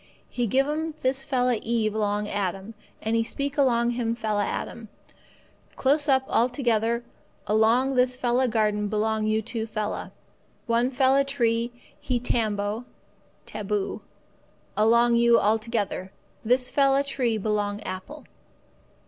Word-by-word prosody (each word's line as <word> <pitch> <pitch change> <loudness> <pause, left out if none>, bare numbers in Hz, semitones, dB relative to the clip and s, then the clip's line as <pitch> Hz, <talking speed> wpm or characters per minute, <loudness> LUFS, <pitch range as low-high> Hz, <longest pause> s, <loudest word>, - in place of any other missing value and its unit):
He 245 -1 -1
give 270 +6 +2
'm 310 +1 -2
this 265 +1 0
fella 250 -3 +1
Eve 225 -2 0
along 210 -1 -1
Adam, 195 +1 -3 0.3
and 220 +1 0
He 230 - +2
speak 280 +4 -4
along 240 -4 +2
him 235 -1 -1
fella 210 -3 -1
Adam: 230 +2 -5 0.9
'Close 290 +2 +1
up 265 -1 +4
altogether 235 -2 +1 0.4
along 225 +5 +3
this 250 0 +2
fella 250 +1 +1
garden 210 -2 +1
belong 215 +1 0
you 215 0 +1
two 225 0 -3
fella. 215 -1 -4 0.5
One 235 +2 +2
fella 265 +1 +3
tree 235 -4 0 0.3
he 250 -2 -1
tambo 215 -1 -1 0.6
(taboo) 210 -1 -3 0.7
along 235 +2 +4
you 235 0 +5
altogether. 215 -3 -1 0.3
This 250 +2 +1
fella 275 0 +3
tree 255 -5 -1
belong 205 -1 -1
apple. 200 +13 -7
235 Hz, 125 wpm, -25 LUFS, 215-255 Hz, 0.9 s, you